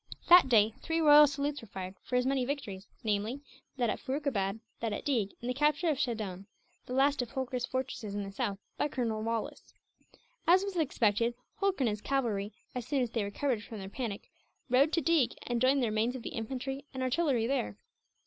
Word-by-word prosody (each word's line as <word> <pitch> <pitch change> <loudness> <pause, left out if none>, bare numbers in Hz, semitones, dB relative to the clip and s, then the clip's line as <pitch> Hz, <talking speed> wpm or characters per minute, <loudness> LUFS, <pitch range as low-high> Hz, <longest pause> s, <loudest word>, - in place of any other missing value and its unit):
That 350 -5 +9
day 220 -2 +5
three 325 0 -1
royal 300 -1 +8
salutes 290 0 -2
were 230 - -12
fired, 185 -1 -6
for 250 - -4
as 250 0 +3
many 265 -1 +1
victories; 220 -8 -4 0.2
namely, 215 +4 -1 0.4
that 240 -4 +1
at - - -4
Furukabad, 245 -8 -1 0.2
that 225 -2 -2
at - - -5
Deeg, 225 -9 0
and 240 - -5
the 250 - 0
capture 300 +5 +2
of 280 - -2
Shaddone 210 -7 -3 0.4
the 250 - -5
last 275 +1 +3
of 245 - -4
Holkar's 255 -1 -2
fortresses 255 -5 -3
in 205 - -2
the 195 - -6
south 200 0 -2 0.2
by - - +1
Colonel 230 -6 -2
Wallis. 225 0 -4 0.7
As 365 +3 +6
was 395 -2 -4
expected, 235 - +1 0.2
Holkar 390 -6 +1
and 245 - +3
his 210 0 -3
cavalry, 220 -7 -1 0.2
as 250 -2 -5
soon 275 -3 +1
as 235 - -3
they 225 -3 0
recovered 220 +3 -1
from 220 - -8
their 195 -1 -7
panic, 210 -2 -5 0.4
rode 275 +5 +5
to 335 - +3
Deeg 280 -5 +3
and 240 -1 -1
joined 265 +1 +4
the - - +2
remains 220 +3 0
of 250 - -6
the - - -4
infantry 265 +4 -4
and 260 - -2
artillery 255 -3 +1
there. 105 - -1
250 Hz, 205 wpm, -31 LUFS, 215-280 Hz, 0.7 s, That